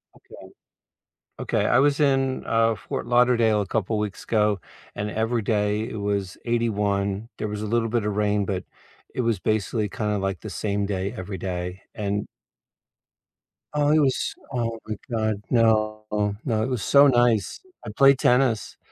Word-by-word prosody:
Okay. - - -14 0.9
Okay, - - 0
I - - +4
was 145 +2 +3
in, 135 -2 +1
uh, 115 0 +2
Fort 95 - -5
Lauderdale 120 -3 +3
a - - -5
couple 110 +1 -1
weeks 105 -2 -4
ago, 105 -3 +1 0.3
and 105 0 -3
every 115 +2 0
day 105 +1 0
it - - -6
was 100 -2 -2
81, 105 -3 0
there 110 - -2
was 105 0 -4
a - - -3
little 115 +1 +1
bit 115 -1 0
of 105 -1 -1
rain, 105 -1 +1
but 95 -2 -3 0.5
it 125 - -1
was 115 -3 +1
basically 110 +2 -1
kinda 105 +1 -2
like 95 0 -2
the 110 - -7
same 100 0 -2
day 100 -1 -2
every 95 +1 -6
day, 90 0 -4
and 105 -1 -2 1.5
Oh, 145 -1 +2
it 155 +1 +5
was 135 -3 +1 0.2
Oh 115 -2 -1
my 110 - -3 0.2
god, 110 -3 -1
no, 110 -2 +2 0.4
no, 110 -5 +1
it - - -1
was 125 -5 -2
so 140 0 +6
nice. 120 -5 +2 0.3
I 105 - -5
played 140 0 +6
tennis, 125 -3 +2
110 Hz, 165 wpm, -24 LUFS, 100-120 Hz, 1.5 s, so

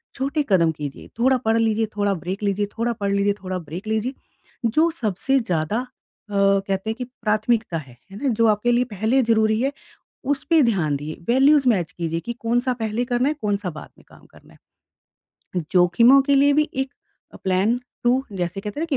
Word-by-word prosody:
छोटे 280 +3 -1
कदम 170 -4 +4
कीजिए, 145 -3 -7
थोड़ा 260 +2 +4
पढ़ 225 +1 +3
लीजिए, 225 0 +1
थोड़ा 205 -1 +1
ब्रेक 190 +3 -5
लीजिए 200 0 0
थोड़ा 235 +1 0
पढ़ 200 -2 -2
लीजिए 200 0 +2
थोड़ा 185 0 -3
ब्रेक 175 +6 -8
लीजिए। 220 +4 -1 0.5
जो 310 +9 +3
सबसे 245 - 0
ज़्यादा 180 -1 -1 0.5
अ, 205 - -9
कहते 195 +1 +1
हैं 220 - -4
कि 250 - -5
प्राथमिकता 220 -4 -1
है, 130 -6 -10
है 200 - -9
ना? 275 - +2
जो 230 -1 +2
आपके 215 +3 +2
लिए 240 +1 +3
पहले 220 +4 +1
ज़रूरी 220 -1 +3
है, 275 +2 +1 0.5
उसपे 290 +4 +2
ध्यान 175 - +1
दिए, 150 +2 -6 0.2
वैल्यूज़ 270 +2 +5
मैच 180 -7 +1
कीजिए 165 -1 -3
कि 235 - -5
कौन-सा 245 +2 0
पहले 220 +3 -1
करना 245 +3 +2
है, 305 - -2
कौन-सा 200 -3 -1
बाद - - -9
में - - -20
काम - - -18
करना - - -19 0.8
है। 180 -2 -6
जोखिमों 230 +10 +6
के 280 - +4
लिए 285 +1 +5
भी 300 +1 +2
एक 265 0 -2 0.4
अ, - - -10
प्लान 195 +6 +1 0.2
2 240 0 +4 0.2
जैसे 180 +1 -3
कहते 210 +6 -6
हैं 320 - -1
ना - - 0
220 Hz, 195 wpm, -22 LUFS, 190-250 Hz, 0.8 s, जोखिमों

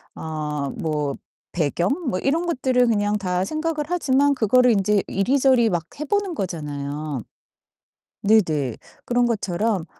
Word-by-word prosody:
어 150 -3 -4
뭐 150 -3 -2 0.4
배경 170 +2 0 0.2
뭐 185 -5 0
이런 325 +6 0
것들을 255 -6 +2
그냥 205 -1 +1
다 180 -2 -1
생각을 310 +1 -2
하지만 285 -4 +2
그거를 250 +2 +4
인제 205 -1 +2
이리저리 250 +2 +3
막 175 -1 0 0.2
해 305 - -3
보는 400 -1 -1
거잖아요. 150 - -4 1.0
네네. 160 - +2 0.3
그런 245 0 +2
것처럼 205 -3 -1
205 Hz, 260 characters per minute, -23 LUFS, 160-260 Hz, 1.0 s, 그거를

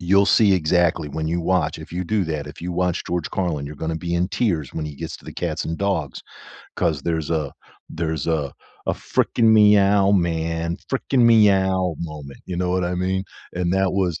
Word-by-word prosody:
you'll 100 +3 +3
see 105 -2 +5
exactly 85 -1 +1
when 80 +2 -3
you 85 +2 -1
watch, 85 -3 0
if 80 +1 -11
you 90 +1 -2
do 100 +2 0
that, 75 -3 -3
if - - -11
you 90 +1 -4
watch 90 0 -1
George 85 -2 -2
Carlin, 85 -7 -2
you're 75 +1 -8
gonna 80 +2 -3
be 85 +1 -3
in 85 +1 +1
tears 85 - -1
when 80 - -3
he 75 -2 -8
gets - - -6
to - - -19
the - - -8
cats - - -3
and 80 - -4
dogs, 95 -9 -1 0.6
'cause 80 -6 0
there's 80 -1 -2
a 75 -4 -1 0.4
there's 80 -2 -3
a 75 -4 -1 0.3
a - - +2
"freaking 115 - 0
meow, 100 -2 +5
man 85 -2 0
freaking 130 -2 +1
meow" 95 -5 +4
moment, 75 -4 -7
you 90 - -4
know 90 0 -1
what 90 0 +1
I 90 +1 -1
mean? 95 +1 -1 0.3
And 90 0 -1
that 95 0 +2
was 90 -4 0
85 Hz, 205 wpm, -22 LUFS, 80-95 Hz, 0.6 s, see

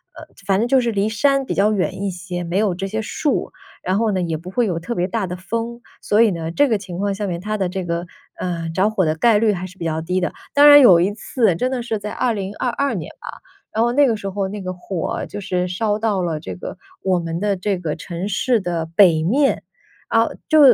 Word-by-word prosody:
呃， - - -10 0.2
反 195 0 +2
正 230 - +1
就 265 +1 +4
是 235 -1 0
离 200 -1 0
山 275 +5 +2
比 - - -2
较 205 +2 +3
远 190 -1 -1
一 200 - 0
些， 180 0 -5
没 170 +2 -2
有 200 -3 +1
这 195 +2 -4
些 220 +3 -2
树。 290 +7 -1 0.3
然 185 +2 0
后 225 0 +1
呢 190 - 0
也 165 -2 -1
不 170 +4 -9
会 240 +4 +1
有 175 -4 -1
特 170 +8 -4
别 180 -4 0
大 200 +1 -1
的 180 0 -5
风， 230 +5 -4 0.2
所 210 +2 +3
以 230 -3 +5
呢， 165 -2 -4
这 285 +12 +3
个 225 -4 +2
情 185 -3 -8
况 200 +1 -1
下 205 +1 -3
面 175 -2 -3
它 215 +4 -3
的 190 -3 -1
这 185 0 -4
个， 170 0 -2 0.3
呃， 170 -2 -3
着 190 +5 +2
火 200 -4 +1
的 155 0 +1
概 220 +6 +4
率 215 -1 +3
还 185 -1 -4
是 185 +1 -12
比 170 - -5
较 160 -1 -1
低 180 +3 -1
的。 180 - -2 0.2
当 290 +1 +7
然 290 0 +10
有 185 -10 +8
一 190 +4 +1
次 215 -2 +1
真 255 +9 -1
的 255 -2 -2
是 230 -2 -2
在 210 0 -6
2022 235 +4 -1
年 - - -5
吧， - - -10 0.5
然 220 - +1
后 240 +1 +2
那 285 +2 +5
个 230 -4 +1
时 195 -1 -5
候 195 0 -2
那 205 +1 -6
个 185 -1 -4
火 180 -1 -4
就 205 - -7
是 180 -2 -1
烧 205 +3 0
到 215 -3 0
了 165 -4 -2
这 95 - -6
个 90 - -7 0.3
我 185 -2 +2
们 165 0 -4
的 205 0 +1
这 195 +1 -1
个 160 -4 -3
城 170 +3 -5
市 230 +4 +1
的 175 -4 -2
北 170 -6 +6
面。 270 - +2 0.5
啊， - - +3 0.2
就 315 -2 +5
195 Hz, 270 characters per minute, -20 LUFS, 180-225 Hz, 0.5 s, 然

